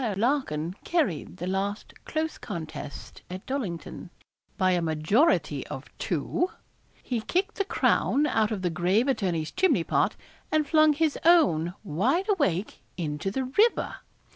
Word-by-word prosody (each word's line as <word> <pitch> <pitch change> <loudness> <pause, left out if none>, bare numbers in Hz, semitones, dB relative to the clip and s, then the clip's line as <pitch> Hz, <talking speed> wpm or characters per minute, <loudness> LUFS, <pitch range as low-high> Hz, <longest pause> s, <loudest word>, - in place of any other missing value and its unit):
Larkin 195 - 0
carried 205 - -1
the 180 - -4
last 195 +3 -2
close 315 0 -2
contest 155 -4 -7
at 185 +1 -7
Dollington, 195 - -4 0.5
by 185 -3 +3
a 175 -1 +2
majority 165 - +2
of - - -8
two, 360 - -1 0.5
he 240 -3 -2
kicked 380 - 0
the 395 - +2
crown 295 -6 +2
out 220 -7 +2
of 210 -4 -3
the 175 - +1
grave 180 - +2
attorney's 175 - 0
chimney 375 0 +2
pot, - - +1 0.4
and 310 -1 +2
flung 310 -1 +5
his 310 0 0
own 190 - +4
wide 230 - +1
awake 220 - 0 0.2
into 155 +1 -2
the 260 +7 -2
river. 410 - +2
215 Hz, 140 wpm, -27 LUFS, -, 0.5 s, flung